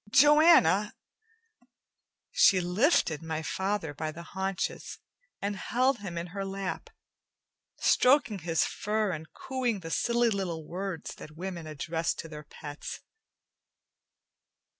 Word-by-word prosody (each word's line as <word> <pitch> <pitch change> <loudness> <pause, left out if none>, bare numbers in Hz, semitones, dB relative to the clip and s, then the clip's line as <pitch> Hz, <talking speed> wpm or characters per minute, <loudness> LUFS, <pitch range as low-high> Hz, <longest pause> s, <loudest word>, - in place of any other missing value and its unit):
"Joanna!" 275 - +6 1.4
She 190 - +5
lifted 180 - +2
my 160 -1 -4
father 190 -4 -2
by 155 +2 -4
the 170 +2 -9
haunches, 190 +1 -3 0.4
and 200 +1 -2
held 250 +5 +1
him 185 -4 -6
in 170 - -2
her 200 -1 -3
lap, 195 0 -4 0.9
stroking 250 -6 +4
his 165 -1 +1
fur 210 -1 -1
and 160 -2 -6
cooing 250 -4 -2
the 165 -1 -7
silly 235 +3 +2
little 175 -6 -3
words 185 -1 -5
that 155 0 -11
women 175 -2 -5
address 160 +2 -2
to - - -7
their 150 -1 -9
pets. 145 0 -8
190 Hz, 120 wpm, -29 LUFS, 165-215 Hz, 1.4 s, Joanna